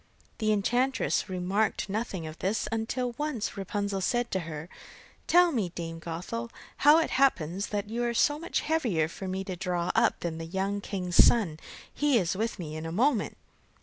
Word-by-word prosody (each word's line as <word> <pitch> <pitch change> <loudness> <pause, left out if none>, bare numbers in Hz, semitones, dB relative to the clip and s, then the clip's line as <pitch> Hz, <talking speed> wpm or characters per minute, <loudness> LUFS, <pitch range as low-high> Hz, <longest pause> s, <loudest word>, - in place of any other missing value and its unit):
The 215 -1 +2
enchantress 245 +3 +1
remarked 190 +4 0
nothing 200 -4 -3
of 155 +1 -8
this, 200 +4 -1
until 240 +3 -1
once 295 -9 -2
Rapunzel 200 0 -2
said 240 +5 0
to 190 - 0
her: 155 +1 -6 0.6
'Tell 350 0 +6
me, 220 - 0
Dame 165 -1 -6
Gothel, 180 +8 -5 0.3
how 295 +2 +7
it 330 - +1
happens 195 - +2
that 205 0 -3
you 235 +3 -2
are 240 0 0
so 290 +5 +3
much 335 - -1
heavier 235 - +1
for 190 +3 -7
me 190 +1 -2
to 190 -2 -5
draw 180 -1 -1
up - - +2
than 165 -2 -3
the 165 - -5
young 195 +3 -2
king's 180 -3 +3
son 185 -10 +3 0.3
he 290 -4 +3
is 185 -3 0
with 225 +3 -2
me 155 -4 -6
in 155 +1 -5
a - - -4
moment. 230 - +1
200 Hz, 180 wpm, -28 LUFS, 180-240 Hz, 0.6 s, how